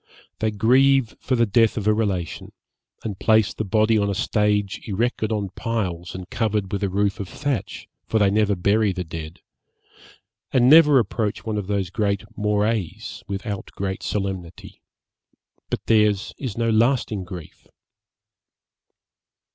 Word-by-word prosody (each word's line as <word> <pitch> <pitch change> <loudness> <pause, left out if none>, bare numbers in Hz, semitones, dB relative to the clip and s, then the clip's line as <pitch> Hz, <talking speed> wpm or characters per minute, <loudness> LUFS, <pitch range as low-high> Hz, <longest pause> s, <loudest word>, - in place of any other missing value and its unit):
They 110 - +1
grieve 130 +4 +3
for 130 - -1
the 120 -1 +3
death 115 +2 +3
of 105 - -2
a 110 - +4
relation, 100 -6 -2 0.5
and 105 -4 -5
place 110 -2 +3
the - - -3
body 110 +2 +2
on 100 0 +1
a 100 - -1
stage 105 -1 0
erected 110 +1 -1
on 105 -3 -1
piles 90 -7 -3
and 90 -1 -7
covered 105 -3 -1
with 100 - -1
a 100 - +1
roof 100 0 0
of 100 -3 -5
thatch, 140 -8 -4 0.2
for 110 - +1
they 100 -2 +3
never 105 -1 +2
bury 100 +2 +2
the 90 0 -3
dead, 80 -1 -8 1.1
and 125 -2 +4
never 150 -1 +8
approach 110 -1 -1
one 110 -2 -1
of 100 - -5
these 100 -3 -1 0.4
morais 105 -2 0 0.3
without 100 0 -5
great 95 -1 -3
solemnity; 95 -5 -5 0.9
but - - -3
theirs 105 -3 +2
is 125 -7 -5
no 115 -1 +1
lasting 110 -3 +1
grief. 90 -2 -10
105 Hz, 145 wpm, -23 LUFS, 95-110 Hz, 1.1 s, never